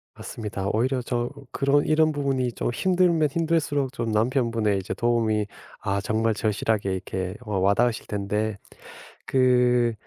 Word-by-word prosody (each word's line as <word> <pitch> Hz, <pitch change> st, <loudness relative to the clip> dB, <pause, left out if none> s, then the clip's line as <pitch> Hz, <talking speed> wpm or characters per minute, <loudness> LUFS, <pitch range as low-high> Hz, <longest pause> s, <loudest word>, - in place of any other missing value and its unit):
맞습니다. 105 Hz, -3 st, -5 dB
오히려 125 Hz, +4 st, +1 dB
좀 120 Hz, 0 st, -2 dB, 0.2 s
그런 140 Hz, +1 st, +2 dB
이런 155 Hz, 0 st, +3 dB
부분이 135 Hz, -4 st, -1 dB
좀 -, -, -2 dB
힘들면 175 Hz, 0 st, +2 dB
힘들수록 145 Hz, -4 st, 0 dB
좀 115 Hz, -4 st, -2 dB
남편분의 115 Hz, -2 st, +1 dB
이제 95 Hz, 0 st, -4 dB
도움이 115 Hz, -3 st, +1 dB, 0.3 s
아, 100 Hz, 0 st, -1 dB
정말 110 Hz, +1 st, 0 dB
절실하게 105 Hz, -2 st, 0 dB
이렇게 95 Hz, 0 st, -4 dB
와 105 Hz, -3 st, -1 dB
와닿으실 105 Hz, +5 st, +2 dB
텐데 105 Hz, +1 st, -2 dB, 0.7 s
그 125 Hz, -2 st, +3 dB
120 Hz, 305 characters per minute, -25 LUFS, 105-135 Hz, 0.7 s, 이런